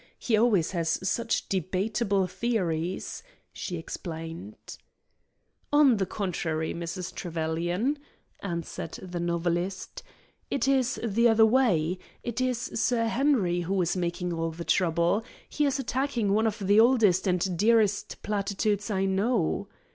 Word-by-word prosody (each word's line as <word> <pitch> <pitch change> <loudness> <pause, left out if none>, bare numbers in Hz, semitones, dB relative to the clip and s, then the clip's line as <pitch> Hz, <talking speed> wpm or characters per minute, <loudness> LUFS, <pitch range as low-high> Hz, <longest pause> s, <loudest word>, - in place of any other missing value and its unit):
He 230 - +1
always 215 -7 +3
has 170 +1 -1
such 230 +3 0
debatable 195 +2 0
theories," 180 -6 -2 0.3
she 175 - -4
explained. 165 +4 -7 1.2
"On 290 -5 +5
the 190 -2 -1
contrary, 165 -5 -2
Mrs. 170 +2 -5
Trevelyan," 175 - -1 0.4
answered 170 -3 -5
the 180 -2 -6
novelist, 175 +2 -2 0.5
"it 275 - 0
is 260 -2 +2
the 230 +1 +3
other 220 0 +6
way. 190 -8 +2 0.2
It 240 +1 -3
is 255 -1 +1 0.2
Sir 235 -2 +1
Henry 230 -9 +2
who 185 +3 -1
is 175 0 +1
making 175 0 -2
all 165 0 -1
the 165 +1 -7
trouble. 170 +3 +2 0.2
He 300 - 0
is 275 - 0
attacking 255 -4 -1
one 220 +2 +3
of 210 - -2
the 205 0 +3
oldest 220 -6 +4
and 180 0 +1
dearest 210 +1 +2
platitudes 205 +1 -1
I 195 -2 +1
know." 200 -1 0
195 Hz, 130 wpm, -27 LUFS, 175-230 Hz, 1.2 s, other